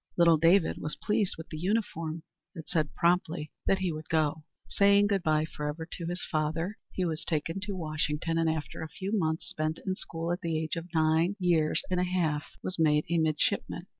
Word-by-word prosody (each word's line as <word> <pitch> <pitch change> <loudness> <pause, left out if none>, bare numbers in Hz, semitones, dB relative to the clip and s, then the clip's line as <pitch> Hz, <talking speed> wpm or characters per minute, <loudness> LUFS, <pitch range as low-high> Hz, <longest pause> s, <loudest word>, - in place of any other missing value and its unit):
Little 170 -2 +6
David 165 +3 +4
was 150 - -3
pleased 210 -2 0
with 160 - -9
the 155 - -6
uniform, 165 -5 -1 0.3
and 165 - -6
said 155 -2 0
promptly 170 -3 +1 0.2
that 195 - +4
he 190 -2 -1
would 155 0 -7
go. 155 -1 +1 0.2
Saying 200 0 +5
good 200 -2 +1
bye 155 -2 +2
forever 150 +1 -5
to 170 - -5
his 175 +1 -3
father, 165 +5 -1
he 185 - -1
was 160 -2 -2
taken 165 +3 -1
to 200 0 -4
Washington, 155 0 -1
and 165 -1 +2
after 160 -2 -3
a 160 - -5
few 190 +4 -5
months 160 -5 0
spent 155 +1 -2
in 190 - 0
school, 165 -2 -4
at 175 - -2
the 165 -2 -1
age 160 0 -2
of 165 +1 -6
nine 160 +4 +3
years 170 -5 +2
and 180 - +2
a - - +3
half, 170 -5 0 0.2
was 185 -2 -4
made 150 -1 +4
a 170 - +3
midshipman. 155 -2 0
165 Hz, 200 wpm, -29 LUFS, 155-180 Hz, 0.3 s, Little